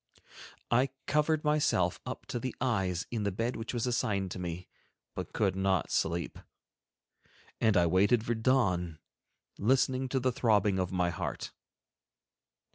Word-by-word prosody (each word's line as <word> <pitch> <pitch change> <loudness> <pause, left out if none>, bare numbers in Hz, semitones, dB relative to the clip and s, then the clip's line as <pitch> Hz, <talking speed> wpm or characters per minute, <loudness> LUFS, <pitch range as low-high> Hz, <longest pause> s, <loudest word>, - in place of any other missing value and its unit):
I 125 +3 +3 0.2
covered 150 +1 +1
myself 150 - +2
up - - -6
to 120 - -2
the 130 +1 -4
eyes 95 -9 0
in 115 -3 -2
the 100 -1 0
bed 115 +6 -2
which 115 - -5
was 120 -1 -1
assigned 100 -6 0
to - - -5
me, 90 0 -5 0.5
but - - -6
could 95 -3 +1
not 95 -3 +1
sleep; 85 +1 -1 1.2
and 110 -3 +3
I 85 - +5
waited 100 +7 +3
for 120 - +1
the 110 - -6
dawn 90 -10 +2 0.6
listening 130 +3 +2
to 130 - +1
the 130 0 +1
throbbing 105 -5 +2
of 90 -1 -1
my 90 -2 +1
heart. - - -4
105 Hz, 150 wpm, -31 LUFS, 90-125 Hz, 1.2 s, I